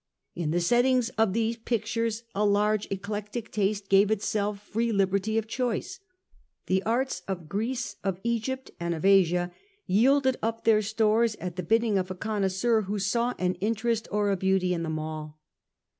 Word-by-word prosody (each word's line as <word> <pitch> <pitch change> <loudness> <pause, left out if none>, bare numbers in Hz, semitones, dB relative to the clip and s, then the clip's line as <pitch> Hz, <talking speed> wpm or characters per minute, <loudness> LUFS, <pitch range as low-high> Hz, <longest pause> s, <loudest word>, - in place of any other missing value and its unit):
In 170 -3 -3
the 170 +3 +1
settings 245 +6 +3
of 220 -5 +1
these 230 +1 0
pictures 230 0 -2
a 205 - 0
large 210 +1 +2
eclectic 210 +3 -5
taste 205 -1 -1
gave 195 +1 +5
itself 210 -1 -1
free 225 +3 -2
liberty 200 +1 +1
of 225 - 0
choice. 250 - -3 0.7
The 190 0 +1
arts 235 -2 -1
of 180 -5 -4
Greece, 220 +3 -3
of 190 -2 -1
Egypt, 235 +3 -2
and 170 0 -1
of 160 - -4
Asia 180 -2 +4 0.3
yielded 260 +6 +3
up 225 0 -2
their 220 -2 +4
stores 220 +1 +2
at 180 -1 -6
the 185 - -2
bidding 220 +3 +2
of 185 0 -3
a 185 - -4
connoisseur 215 +2 0
who 205 +1 -3
saw 235 +5 0
an 180 0 0
interest 225 +1 0
or 205 -1 +1
a - - +2
beauty 190 -1 +1
in 170 - -2
them 160 -1 -2
all. 155 -1 -6
210 Hz, 170 wpm, -27 LUFS, 190-230 Hz, 0.7 s, gave